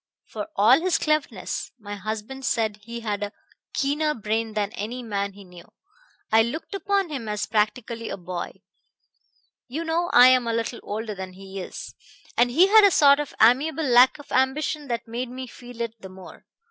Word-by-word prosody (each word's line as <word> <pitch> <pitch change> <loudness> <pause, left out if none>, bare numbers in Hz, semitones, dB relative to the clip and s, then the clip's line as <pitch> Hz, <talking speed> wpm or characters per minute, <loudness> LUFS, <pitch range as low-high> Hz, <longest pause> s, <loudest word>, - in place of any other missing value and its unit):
For 210 -2 -6
all 230 +9 +5
his 365 -1 +2
cleverness 295 -11 -2
my 205 -1 -8
husband 215 +6 -5
said 220 -5 0
he 235 +3 -8
had 210 -3 -3
a 205 0 -3 0.4
keener 300 +2 0
brain 220 0 -2
than 205 -1 -1
any 240 +2 -5
man 200 -3 -3
he 200 0 -13
knew 180 -2 -14 0.7
I 220 +1 +6
looked 280 - -4
upon 395 -2 0
him 260 -8 -5
as 210 0 -2
practically 225 +2 -1
a - - -4
boy. 180 -1 -7 1.0
You 295 +6 -4
know 335 +2 0
I 250 +1 +8
am 255 -2 +3
a 230 - 0
little 230 +1 -2
older 215 +1 -4
than 190 -1 -7
he 195 +1 -9
is, 180 - -8 0.4
and 245 +1 +4
he 320 +10 +5
had 430 +2 +7
a 405 - +8
sort 285 -5 +5
of 295 - -5
amiable 275 +8 +4
lack 250 0 +6
of 290 - -14
ambition 285 +3 0
that 235 -2 -3
made 240 +2 -4
me 255 +1 -6
feel 245 -1 -12
it 230 -1 -3
the 190 - -9
more. 185 -1 -13
235 Hz, 185 wpm, -24 LUFS, 210-280 Hz, 1.0 s, I